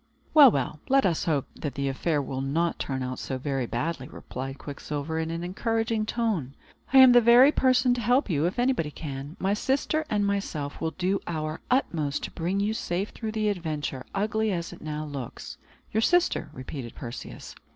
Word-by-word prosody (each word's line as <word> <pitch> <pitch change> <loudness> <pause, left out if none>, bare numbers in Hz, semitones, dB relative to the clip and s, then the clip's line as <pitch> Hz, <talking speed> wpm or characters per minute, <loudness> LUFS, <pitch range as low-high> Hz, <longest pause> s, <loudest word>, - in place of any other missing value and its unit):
"Well, 290 -4 +10
well, 145 - -2
let 270 0 +4
us 170 -4 +1
hope 150 -5 +1
that 145 - -5
the 140 0 -1
affair 145 +2 0
will 135 0 -4
not 160 +5 0
turn 130 -2 -2
out 125 0 -4
so 130 - -3
very 135 -2 -2
badly," 135 +2 -3
replied 135 +2 -7
Quicksilver, 150 +2 -4
in 160 0 -2
an 165 +1 -3
encouraging 225 +4 -1
tone. 205 - -1 0.4
"I 270 - +5
am 260 -1 +10
the 245 0 +7
very 240 +5 +7
person 255 -3 +3
to 245 - -2
help 245 +5 +3
you, 155 -5 +1
if 185 - -4
anybody 245 - +1
can. 145 +2 -7
My 195 +1 +1
sister 275 +7 0
and 205 -1 +1
myself 185 -8 -2
will 160 0 -2
do 185 +2 +1
our 155 -1 -3
utmost 160 - 0
to - - -4
bring 180 +3 -1
you 205 +2 +1
safe 195 -2 -2
through 220 -2 -5
the 215 -1 +1
adventure, 155 -8 -3
ugly 215 +2 0
as 170 -3 -3
it - - -13
now 155 0 -4
looks." 140 -5 -7 0.3
"Your 220 - +1
sister?" 355 - +2
repeated 130 -3 -7
Perseus. 120 -2 -8
170 Hz, 190 wpm, -27 LUFS, 145-220 Hz, 0.4 s, Well